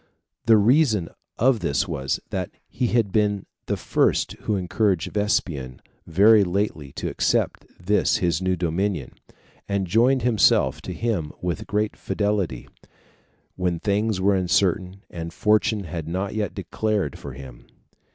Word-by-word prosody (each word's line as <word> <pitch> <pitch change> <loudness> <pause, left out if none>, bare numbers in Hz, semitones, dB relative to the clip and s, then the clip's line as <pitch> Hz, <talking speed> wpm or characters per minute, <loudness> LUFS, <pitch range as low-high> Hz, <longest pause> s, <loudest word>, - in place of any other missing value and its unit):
The 110 -1 +7
reason 110 - +3 0.3
of 125 0 +3
this 70 -8 0
was, 65 0 -2
that - - -2 0.2
he 125 0 -1
had 115 -4 +1
been 105 -2 +1 0.2
the - - -1
first - - +1
who 105 - -3
encouraged 95 0 0
Vespasian 80 -11 -1 0.3
very 100 +5 +6
lately 90 -7 -2
to - - -4
accept - - 0
this 100 +4 +2
his 85 -2 0
new 95 0 +1
dominion, 90 -2 -2 0.6
and 100 -1 0
joined 120 +7 +3
himself 105 - +3
to - - -6
him 105 -10 -2
with 90 -3 -3
great 105 +1 -1
fidelity, 100 - -2 0.9
when 90 -2 -1
things 105 +1 0
were 100 +2 +3
uncertain, 95 +1 0
and 85 -1 -6
fortune 105 0 +2
had 80 -2 -6
not 95 +4 -3
yet 105 -3 -2
declared 105 -9 -2
for 70 - -8
him. 65 -2 -12
100 Hz, 140 wpm, -24 LUFS, 85-105 Hz, 0.9 s, The